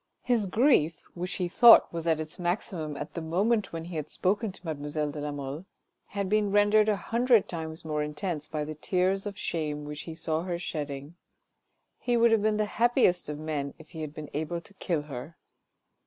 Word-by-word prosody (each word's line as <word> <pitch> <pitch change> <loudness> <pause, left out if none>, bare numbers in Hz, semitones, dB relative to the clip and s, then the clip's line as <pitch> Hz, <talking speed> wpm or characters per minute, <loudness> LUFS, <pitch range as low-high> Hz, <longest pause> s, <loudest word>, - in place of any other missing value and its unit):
His 235 -5 +1
grief 185 - +3
— - - -37
which 180 +1 -4
he 180 - -1
thought 230 +4 +8
was 170 0 -4
at 160 -1 +3
its 155 +2 -7
maximum 175 -4 -2
at 150 - -6
the 170 - -4
moment 200 +7 +1
when 165 -1 -5
he 170 -1 -6
had 150 0 -4
spoken 205 +3 0
mademoiselle 150 -2 -2
de 150 - -6
la 150 0 -3
Mole 145 +4 -5 0.2
— - - -51
had 200 -1 0
been 210 +1 +2
rendered 205 +1 +4
a 210 - +3
hundred 235 +2 +3
times 160 -1 -6
more 150 -1 -1
intense 150 +1 -3
by 155 -1 -3
the 155 - -5
tears 185 +5 0
of 200 -1 -6
shame 150 -5 -3
which 150 0 -6
he 160 - -6
saw 160 -1 -1
her 175 -1 -3
shedding. 145 -1 -5 0.8
He 245 -1 +1
would 235 0 +5
have 225 -2 +4
been 215 0 +2
the 215 - +2
happiest 225 - +2
of 150 - -4
men 150 -2 -3
if 160 -1 -15
he 160 - -7
had 155 -2 -4
been 150 -1 -8
able 160 +3 -2
to 200 - -16
kill 170 -5 -2
her. 150 +2 -8
170 Hz, 210 wpm, -28 LUFS, 150-200 Hz, 0.8 s, thought